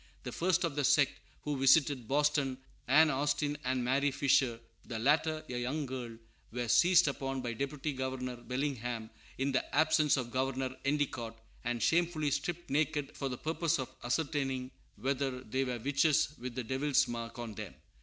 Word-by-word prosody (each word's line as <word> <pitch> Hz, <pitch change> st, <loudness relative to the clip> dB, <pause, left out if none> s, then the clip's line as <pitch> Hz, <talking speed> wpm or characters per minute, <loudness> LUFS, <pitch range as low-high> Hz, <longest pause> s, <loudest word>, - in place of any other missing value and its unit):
The -, -, -5 dB
first 180 Hz, +1 st, +1 dB
of 165 Hz, -5 st, -1 dB
the 145 Hz, -, 0 dB
sect 140 Hz, +1 st, +4 dB, 0.3 s
who 145 Hz, -2 st, -2 dB
visited 135 Hz, -3 st, +4 dB
Boston, 145 Hz, -1 st, +1 dB, 0.3 s
Ann 155 Hz, +4 st, +6 dB
Austin 145 Hz, +1 st, 0 dB
and 130 Hz, 0 st, 0 dB
Mary 140 Hz, +3 st, +2 dB
Fisher, 130 Hz, -3 st, +2 dB, 0.2 s
the 115 Hz, -, -5 dB
latter 155 Hz, +5 st, +2 dB
a 125 Hz, -1 st, -3 dB
young 140 Hz, +5 st, -2 dB
girl, 125 Hz, -3 st, -6 dB, 0.3 s
were 120 Hz, +1 st, -3 dB
seized 175 Hz, +6 st, +5 dB
upon 135 Hz, -1 st, -2 dB
by 120 Hz, -1 st, -2 dB
Deputy 140 Hz, +4 st, -3 dB
Governor 130 Hz, -1 st, -3 dB
Bellingham, 120 Hz, -3 st, -3 dB, 0.3 s
in 135 Hz, +1 st, 0 dB
the 130 Hz, -, +1 dB
absence 150 Hz, -1 st, +4 dB
of 120 Hz, -2 st, -3 dB
Governor 130 Hz, 0 st, -1 dB
Endicott, 130 Hz, -5 st, -1 dB, 0.3 s
and 120 Hz, -1 st, -1 dB
shamefully 165 Hz, -3 st, +2 dB
stripped 175 Hz, +2 st, -3 dB
naked 150 Hz, -1 st, 0 dB
for 135 Hz, -, -3 dB
the 125 Hz, -, -4 dB
purpose 160 Hz, +2 st, 0 dB
of 130 Hz, -2 st, -5 dB
ascertaining 135 Hz, -1 st, -1 dB, 0.2 s
whether 130 Hz, +2 st, -2 dB
they 130 Hz, +4 st, -1 dB
were 125 Hz, -2 st, -2 dB
witches 145 Hz, +5 st, +2 dB
with 125 Hz, 0 st, -6 dB
the 130 Hz, -, -2 dB
Devil's 135 Hz, +4 st, +2 dB
mark 115 Hz, 0 st, -5 dB
on 120 Hz, -2 st, -5 dB
them. 105 Hz, -2 st, -7 dB
135 Hz, 165 wpm, -32 LUFS, 125-150 Hz, 0.3 s, Ann